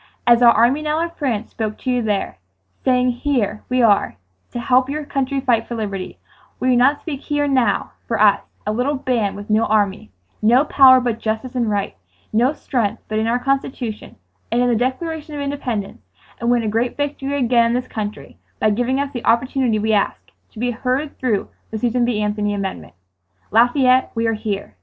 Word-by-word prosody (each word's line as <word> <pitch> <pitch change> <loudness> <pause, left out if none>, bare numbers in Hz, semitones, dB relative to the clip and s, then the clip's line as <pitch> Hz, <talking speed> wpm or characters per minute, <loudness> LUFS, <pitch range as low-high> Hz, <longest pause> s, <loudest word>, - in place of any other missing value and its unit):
"As 240 0 +5
our 240 -1 +8
army 240 +7 +3
now 305 +1 -1
in 340 0 -2
France 245 -9 -3
spoke 215 -2 -4
to 255 - -3
you 250 -1 +1
there, 205 - -2 0.4
saying 250 -1 +3
here 240 -5 -1
we 255 -1 +2
are 205 - +3 0.3
to 240 - -5
help 255 +2 +2
your 300 +1 -3
country 275 -1 -1
fight 240 -4 +1
for 240 - -5
liberty, 200 -4 -5 0.4
will 255 - +1
you 250 - +4
not 275 +4 +4
speak 290 -5 -5
here 290 -1 -1
and 285 -1 0
now 235 -6 +1 0.2
for 230 - -1
us, 205 -1 +5 0.2
a 210 - 0
little 255 +6 0
band 240 -6 -1
with 205 +1 -7
no 215 +1 +3
army, 205 - 0 0.3
no 245 +6 +4
power 260 -3 +7
but 240 -3 -2
justice 220 +3 -3
and 240 -3 0
right, 200 - -2 0.4
no 240 +5 +3
strength 235 -7 -2
but 215 0 -1
in 220 - 0
our 235 +2 +2
Constitution 250 -4 -3 0.4
and 235 - +2
in 245 0 +3
the 240 - +2
Declaration 300 +6 -3
of - - -4
Independence; 260 - -4 0.4
and 235 - -1
win 240 -1 +2
a - - -2
great 230 +3 -1
victory 285 -1 -2
again 240 -3 +3
in 230 - 0
this 250 +1 -2
country 210 -1 -6 0.2
by 215 - +3
giving 245 +5 0
us 280 0 -2
the 240 - -5
opportunity 245 0 +1
we 220 +1 0
ask,—to 210 +2 -3
be 245 +2 -1
heard 255 +5 -2
through 225 -6 0 0.2
the 220 - -4
Susan 240 +2 +1
B. 240 -3 0
Anthony 210 0 -1
amendment. 195 -1 -5 0.6
"Lafayette, 255 +3 +4
we 230 0 0
are 225 - +1
here!" 210 - -4
240 Hz, 200 wpm, -20 LUFS, 215-260 Hz, 0.6 s, our